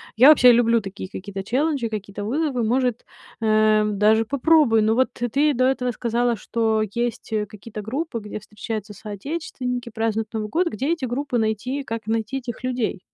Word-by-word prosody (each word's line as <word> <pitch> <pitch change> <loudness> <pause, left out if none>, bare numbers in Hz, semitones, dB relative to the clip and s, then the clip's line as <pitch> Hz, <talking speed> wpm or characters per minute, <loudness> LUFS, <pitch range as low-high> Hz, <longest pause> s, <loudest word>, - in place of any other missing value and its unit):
Я 255 +6 +8
вообще 255 -5 +8
люблю 230 -1 +4
такие 195 -1 -7
какие-то 195 +1 -6
челленджи, 270 +1 0
какие-то 205 -1 -5
вызовы. 270 0 0
Может, 245 +1 0 0.4
эм, 215 -1 +3
даже 220 +2 +4
попробую. 280 -3 +4
Но 220 +1 +3
вот 260 +2 +3
ты 275 +5 +1
до 255 - +2
этого 260 -1 +1
сказала, 240 +1 0
что 220 0 0
есть, 235 -1 -3
э, 210 -1 0
какие-то 210 +1 -9
группы, 255 +4 -3
где 210 0 -7
встречаются 210 0 -6
соотечественники, 250 - -5
празднуют 220 -1 -2
Новый 215 -1 -3
год. 350 - +1
Где 275 0 -2
эти 305 -6 -3
группы 250 +1 -2
найти? 225 +6 -1
Как 230 -4 -5
найти 225 +3 -1
этих 245 -2 -7
людей? 250 -6 -2
230 Hz, 170 wpm, -23 LUFS, 215-255 Hz, 0.4 s, Я